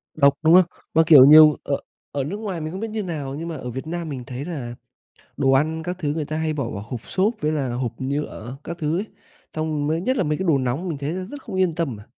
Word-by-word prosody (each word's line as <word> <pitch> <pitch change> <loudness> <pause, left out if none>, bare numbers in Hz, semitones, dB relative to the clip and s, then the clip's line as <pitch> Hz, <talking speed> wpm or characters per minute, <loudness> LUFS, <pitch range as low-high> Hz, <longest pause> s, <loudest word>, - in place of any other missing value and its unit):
Độc, 140 -2 +5
đúng 160 +1 +5
không? 185 0 +8 0.3
Mà, 160 - +5
kiểu, 145 -6 +10
nhiều 155 +1 +8
ở 140 - 0 0.4
ở 140 - -2
nước 165 +9 -4
ngoài 200 -6 -4
mình 155 +1 -4
không 185 - -6
biết 225 - -3
như 215 -1 -3
nào 145 -6 -4
nhưng 165 +3 -5
mà 165 - -4
ở 125 -1 -6
Việt 130 +5 -6
Nam 170 0 -4
mình 130 -4 -5
thấy 130 +2 -6
là 135 -9 -5 0.6
đồ 135 - +3
ăn 155 +4 +1
các 180 +2 -4
thứ 145 -2 -1
người 155 -1 -2
ta 155 +1 -4
hay 160 -1 -1
bỏ 140 -6 -3
vào 100 -3 -6
hộp 120 -1 -5
xốp, 200 +5 +1
với 155 0 +1
là 135 -5 -1
hộp 120 -1 -2
nhựa 135 -3 -4
các 170 +1 -6
thứ 160 0 -1
ấy, 200 - -2 0.5
xong 155 -2 -2
mới 160 +2 0
nhất 260 +6 0
là - - +2
mấy 150 -2 -1
cái 190 - -3
đồ 155 -4 +4
nóng 130 +7 -2
mình 155 - -3
thấy 140 +3 -3
rất 280 +8 -9
không 215 -7 -7
yên 185 -3 +2
tâm 160 -7 -2
mà. 105 - -12
155 Hz, 275 wpm, -23 LUFS, 135-170 Hz, 0.6 s, kiểu